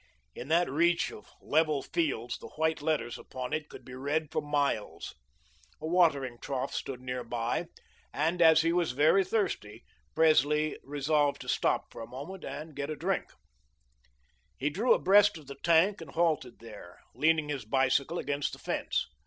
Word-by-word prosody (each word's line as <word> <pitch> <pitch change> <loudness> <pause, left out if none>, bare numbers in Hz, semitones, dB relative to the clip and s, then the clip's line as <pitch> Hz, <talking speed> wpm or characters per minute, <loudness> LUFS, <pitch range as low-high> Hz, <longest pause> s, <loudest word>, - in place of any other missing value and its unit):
In 125 - -8
that 170 +3 +3
reach 170 +5 +2
of - - -12
level 155 -3 +2
fields, 140 -8 -2
the - - -9
white 160 -1 -1
letters 145 -6 -1
upon 125 -1 -6
it 155 -1 -3
could - - -12
be 125 - -10
read 145 +4 -2
for - - -1
miles. 145 -7 -2 0.7
A - - -7
watering 145 -8 +2
trough 135 -2 -3
stood 130 -2 -4
near 125 -1 -4
by, 120 +7 -2 0.4
and, 165 +4 0
as 160 -1 +7
he 165 0 +2
was 170 -7 +1
very 155 +8 +4
thirsty, 180 - -2 0.3
Presley 155 -1 +3
resolved 145 +1 0
to - - -10
stop - - 0
for - - -9
a 115 - -7
moment 145 +10 -8
to 155 +2 -7
get 140 +1 -4
a 155 - -3
drink. - - -2 1.3
He 145 +4 -1
drew 215 - +1
abreast 205 0 +5
of 155 - -13
the 140 0 -9
tank 170 +4 +3
and 160 - -9
halted 155 -6 0
there, 105 -6 -12
leaning 155 -1 +2
his 145 -3 -3
bicycle 135 +7 +1
against 145 -3 -2
the - - -8
fence. - - -1
150 Hz, 170 wpm, -30 LUFS, 130-165 Hz, 1.3 s, as